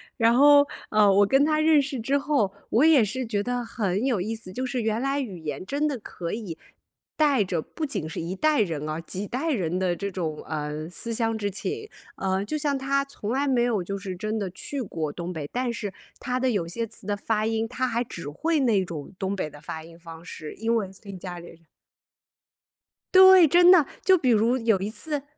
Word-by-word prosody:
然 230 0 +4
后， 285 +2 +7 0.3
呃， 210 -2 +5
我 200 +1 +5
跟 270 +6 +4
他 305 0 +2
认 310 -2 +5
识 270 -2 -4
之 270 +5 +1
后， 275 -9 0 0.2
我 255 +8 +4
也 300 -8 +6
是 250 +5 -3
觉 205 -2 -1
得， 245 -1 -2
很 210 -1 -1
有 235 -9 +1
意 220 +4 -2
思。 200 -5 -9
就 255 +1 -3
是 250 -1 -2
原 220 +1 -1
来 275 +1 0
语 200 -10 -5
言 150 +2 -5
真 285 +5 -1
的 270 - -3
可 170 -4 -6
以， 205 -8 -5 0.6
带 285 -8 +3
着， 175 -4 -2
不 310 - -5
仅 215 - -3
是 165 - -5
一 170 +3 -4
代 310 -5 +3
人 155 -6 -2
啊， 155 +1 -3
几 195 +4 -5
代 290 +7 -2
人 180 - -1
的 185 -2 +1
这 200 +3 -4
种， 165 -5 -4
嗯， 150 +1 -4
思 230 +6 -4
乡 225 -1 0
之 205 -2 -2
情。 430 - -4 0.3
啊， 190 0 -1
就 305 +9 -3
像 285 -2 0
他 275 +1 0
从 235 -6 -6
来 275 +3 +1
没 250 -3 +2
有 220 -7 0
就 200 +2 -4
是 190 -2 -6
真 215 +4 -3
的 195 -3 -3
去 275 +8 -5
过 160 -8 -3
东 175 +2 -5
北。 150 -3 -5
但 250 -1 -1
是 205 -4 -5 0.3
他 255 -1 -1
的 260 0 +1
有 190 -6 0
些 225 +7 -3
词 215 -1 -11
的 205 -1 -1
发 215 +1 -1
音， 225 0 0
他 255 +2 -2
还 235 -1 0
只 170 -11 -6
会 310 - 0
那 215 -7 +3
种 160 -1 -7
东 195 0 -1
北 155 -5 -3
的 145 - -13
发 160 +1 -7
音 165 +1 -14
方 165 -1 -11
式， 155 -3 -8
因 230 +1 0
为 195 -4 -2
跟 195 -2 -8
家 180 -1 -7
里 170 - -11
人 165 0 -16 1.5
对， 375 -3 +9
真 350 +4 +7
的， 335 -6 +7 0.2
就 375 0 +5
比 260 -6 0
如， 230 +3 +3
有 225 -5 +2
一 200 +2 -3
次 290 +4 -4
220 Hz, 245 characters per minute, -25 LUFS, 185-270 Hz, 1.5 s, 对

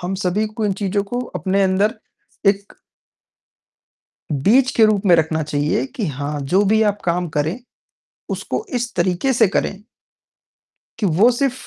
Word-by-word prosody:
हम 180 +2 -3
सभी 195 +4 0
को 220 - 0
इन 205 - +1
चीज़ों 200 0 0
को 245 - -2 0.2
अपने 195 +1 +1
अंदर 195 +3 +2 0.5
एक 200 0 +1 1.6
बीज 230 - +3
के 225 - +6
रूप 215 -1 +1
में 180 - +6
रखना 160 0 0
चाहिए 145 0 -1
कि 265 -6 -4
हाँ, 145 0 -4
जो 180 +9 +2
भी 220 +2 +3
आप 205 -1 0
काम 175 0 0
करें 155 +9 0 0.7
उसको 435 - -3
इस 240 -1 -2
तरीके 180 +9 +1
से 230 -3 +4
करें 200 +1 -2 1.1
कि 215 - 0
वो 190 +8 +4
सिर्फ़ 255 +1 -2
195 Hz, 155 wpm, -20 LUFS, 175-220 Hz, 1.6 s, के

